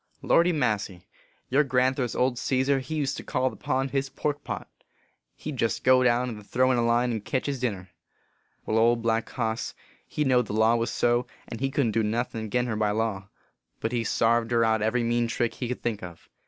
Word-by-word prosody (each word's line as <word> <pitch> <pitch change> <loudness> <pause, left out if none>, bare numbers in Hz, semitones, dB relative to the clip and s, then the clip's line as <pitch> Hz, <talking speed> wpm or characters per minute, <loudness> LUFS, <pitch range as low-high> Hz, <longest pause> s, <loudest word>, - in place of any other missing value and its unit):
Lordy 170 +1 +4
massy! 105 - -1 0.4
your 140 +4 +3
grandthur 130 0 +1
s 120 - -5
old 125 -1 +1
Cesar, 135 +2 +1
he 150 +4 -5
used 140 -3 -1
to - - -6
call 130 0 0
the - - -11
pond 135 0 -1
his 135 -1 -1
pork 145 +1 -3
pot. - - -5 0.7
He 155 - -6
d 135 - -7
jest 115 - 0
go 130 0 +5
down 125 0 +2
and 105 -3 -8
throw 130 +5 +2
in 125 - +2
a - - +2
line 120 +1 +2
and 110 -3 -3
ketch 130 - -2
his 140 -2 -2
din 125 -3 0
ner. 95 -1 -13 0.8
Wai, - - -2
Old 115 0 +3
Black 115 0 0
Hoss 115 -2 -3 0.3
he 150 - -1
know 130 -3 +4
d 115 - -7
the - - -5
law 110 +1 +5
was 115 0 0
so, 120 +1 +1 0.2
and 115 - -7
he 135 +1 0
couldn 135 -4 +1
t 110 - +1
do - - +2
nothin 115 +1 -2
agin 125 +3 0
her 115 -3 -2
by 105 -1 +1
law; 105 -2 -2 0.5
but 115 - -2
he 120 -2 0
sarved 115 +1 +2
her 115 -1 +3
out 110 -1 +2
every 115 +3 +1
mean 120 0 +1
trick 115 0 -1
he 125 - -4
could 125 - -5
think 110 -3 -2
of. 85 -2 -10
120 Hz, 235 wpm, -26 LUFS, 110-130 Hz, 0.8 s, go